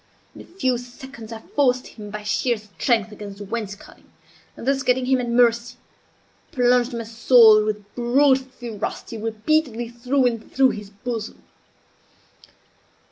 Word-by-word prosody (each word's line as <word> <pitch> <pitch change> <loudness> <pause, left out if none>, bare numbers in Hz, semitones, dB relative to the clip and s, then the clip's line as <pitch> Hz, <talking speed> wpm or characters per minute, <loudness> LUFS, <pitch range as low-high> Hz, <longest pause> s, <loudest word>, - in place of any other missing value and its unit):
In - - -11
a - - -13
few 260 -9 -1
seconds 245 -1 -11
I 225 -1 -7
forced 255 -3 +2
him 210 -2 -10
by 210 0 -7
sheer 220 +3 0
strength 215 +1 -1
against 205 -1 -9
the 205 - -8
wainscoting, 205 -1 -7 0.5
and 235 - -8
thus, 270 0 +2
getting 255 -1 +1
him 260 0 +2
at 240 - -4
mercy, 235 0 +2 0.8
plunged 245 0 +2
my 230 - -4
sword, 225 -1 +6
with 210 -1 -4
brute 260 +3 +3
ferocity, 240 -3 -7
repeatedly 230 +2 -1
through 250 +3 0
and 230 -2 -2
through 265 -1 +4
his 205 -1 -8
bosom. 220 +2 -6
235 Hz, 140 wpm, -22 LUFS, 215-255 Hz, 0.8 s, sword